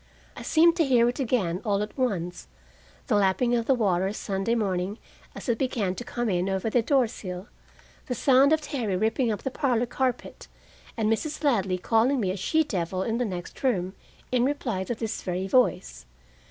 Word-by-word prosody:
I -, -, -8 dB
seemed 335 Hz, +1 st, +4 dB
to 330 Hz, -, +4 dB
hear 245 Hz, -4 st, +4 dB
again, 225 Hz, -9 st, -1 dB
all 205 Hz, -2 st, +1 dB
at 210 Hz, -, -8 dB
once, 185 Hz, -10 st, -2 dB, 0.6 s
the -, -, -1 dB
lapping 205 Hz, +5 st, +2 dB
of 235 Hz, -1 st, 0 dB
the 270 Hz, -, +4 dB
water 190 Hz, -4 st, +1 dB
Sunday 200 Hz, +2 st, -1 dB
morning 195 Hz, -2 st, -1 dB, 0.4 s
as -, -, -8 dB
it 235 Hz, -2 st, 0 dB
began 230 Hz, -8 st, 0 dB
to 240 Hz, -, -7 dB
come 240 Hz, 0 st, -3 dB
in 185 Hz, -1 st, 0 dB
over 195 Hz, +3 st, -1 dB
the 245 Hz, -, +3 dB
door 265 Hz, +2 st, +3 dB
sill; 185 Hz, -1 st, -7 dB, 0.6 s
the 250 Hz, -, -2 dB
sound 270 Hz, +3 st, +4 dB
of 315 Hz, 0 st, +3 dB
Terry 245 Hz, -9 st, -2 dB
ripping 225 Hz, +4 st, +1 dB
up 210 Hz, -, -4 dB
the 265 Hz, -, -2 dB
parlor 245 Hz, -3 st, +1 dB
carpet, 255 Hz, +1 st, -3 dB, 0.5 s
and 220 Hz, -2 st, +1 dB
Mrs. 305 Hz, +7 st, -4 dB
Ladley 195 Hz, -10 st, +2 dB
calling 230 Hz, +8 st, +2 dB
me 190 Hz, -5 st, 0 dB
a -, -, -3 dB
she 315 Hz, -, +1 dB
devil 185 Hz, -, -2 dB
in 230 Hz, +3 st, -1 dB
the 245 Hz, -, +1 dB
next 180 Hz, -4 st, -6 dB
room, 190 Hz, -8 st, 0 dB, 0.4 s
in 250 Hz, -1 st, +2 dB
reply 250 Hz, -8 st, -1 dB
to 240 Hz, -, -3 dB
this 220 Hz, -1 st, -4 dB
very 185 Hz, 0 st, -3 dB
voice. 65 Hz, -, +1 dB
225 Hz, 190 wpm, -26 LUFS, 190-255 Hz, 0.6 s, seemed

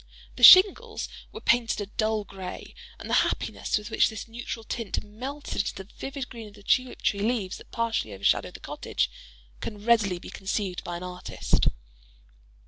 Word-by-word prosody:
The -, -, -9 dB
shingles 375 Hz, +1 st, +8 dB, 0.2 s
were 445 Hz, -, -9 dB
painted 235 Hz, -2 st, +2 dB
a 205 Hz, -, -2 dB
dull 215 Hz, +1 st, -1 dB
gray; 190 Hz, -2 st, -8 dB, 0.2 s
and -, -, -9 dB
the -, -, -2 dB
happiness -, -, -1 dB
with 210 Hz, 0 st, -7 dB
which -, -, +4 dB
this 220 Hz, 0 st, -7 dB
neutral 230 Hz, 0 st, -6 dB
tint 220 Hz, -3 st, -3 dB
melted 255 Hz, +8 st, -6 dB
into 205 Hz, -, -4 dB
the 190 Hz, -, -7 dB
vivid 270 Hz, -1 st, -5 dB
green 230 Hz, -3 st, -9 dB
of 205 Hz, -, -14 dB
the 205 Hz, -, -16 dB
tulip 255 Hz, +4 st, +1 dB
tree 200 Hz, -, +1 dB
leaves 210 Hz, -3 st, -1 dB
that -, -, -15 dB
partially 230 Hz, -, -1 dB
overshadowed 100 Hz, 0 st, +1 dB
the -, -, -8 dB
cottage, -, -, -2 dB, 0.5 s
can 210 Hz, -1 st, -7 dB
readily 220 Hz, -6 st, +3 dB
be -, -, -10 dB
conceived 190 Hz, -1 st, -3 dB
by 175 Hz, 0 st, -4 dB
an 175 Hz, -, -8 dB
artist. 180 Hz, 0 st, -1 dB
215 Hz, 175 wpm, -27 LUFS, 195-235 Hz, 0.5 s, shingles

